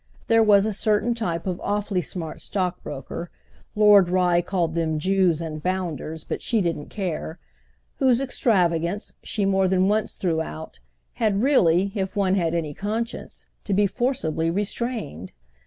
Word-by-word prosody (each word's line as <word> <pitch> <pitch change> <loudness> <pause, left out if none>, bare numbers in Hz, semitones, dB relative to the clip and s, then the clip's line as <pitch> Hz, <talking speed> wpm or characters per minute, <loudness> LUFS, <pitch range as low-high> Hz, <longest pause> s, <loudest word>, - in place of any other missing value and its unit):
There 225 0 +4
was 205 -2 +5
a 215 - -1
certain 215 +3 +1
type 175 -8 -3
of 180 -2 -3
awfully 205 -2 -1
smart 165 -2 -6
stockbroker—Lord 185 +3 0
Rye 180 -1 +3
called 175 -3 -1
them 160 -2 0
Jews 185 -1 +2
and 155 -2 -5
bounders, 165 -3 -3
but - - -4
she 230 - +1
didn't 165 -6 -2
care—whose 160 - -3
extravagance, 190 -8 0
she 205 -3 -2
more 195 -1 +3
than 185 0 +2
once 210 +1 0
threw 165 -4 0
out, 160 - -8 0.4
had 210 -1 +2
really, 195 - +3
if 195 -1 -3
one 195 -2 +2
had 170 -3 +1
any 155 -3 -2
conscience, 220 +7 -4 0.2
to 200 - -1
be 205 +1 +4
forcibly 190 - -1
restrained. 200 - -3
185 Hz, 140 wpm, -24 LUFS, 165-210 Hz, 0.4 s, was